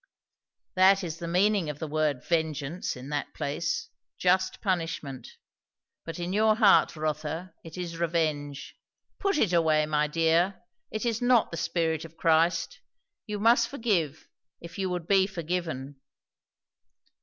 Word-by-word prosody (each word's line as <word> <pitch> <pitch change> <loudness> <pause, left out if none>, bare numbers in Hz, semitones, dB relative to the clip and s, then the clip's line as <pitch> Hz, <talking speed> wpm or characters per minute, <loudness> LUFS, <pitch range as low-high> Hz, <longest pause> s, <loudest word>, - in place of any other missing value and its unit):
"That 190 +1 +5
is 165 -2 -5
the 170 - -5
meaning 185 0 +2
of 150 - -5
the 160 - -5
word 150 -3 0
'vengeance' 160 -1 -1
in 130 +2 -9
that 145 -1 -3
place; 150 +2 -2 0.3
just 185 +1 +1
punishment; 165 - -3 0.7
but 165 - -6
in 175 +1 -3
your 215 +1 +4
heart, 210 -6 +5
Rotha, 155 +3 -3
it 165 +1 -10
is 170 -2 -5
revenge. 155 -4 -2 0.4
Put 395 -3 +1
it 205 - +2
away, 160 -2 +3
my 150 0 +1
dear. 165 +6 +1 0.3
It 215 +2 -4
is 230 0 -1
not 245 -1 +3
the 170 - -5
spirit 160 -1 -1
of 165 0 -12
Christ. 165 +1 +2 0.5
You 210 -1 -4
must 230 +2 +4
forgive, 190 - -1 0.3
if 170 +3 -10
you 190 -1 0
would 180 -2 -3
be 195 -1 +4
forgiven." 165 -7 -4
170 Hz, 145 wpm, -28 LUFS, 155-190 Hz, 0.7 s, That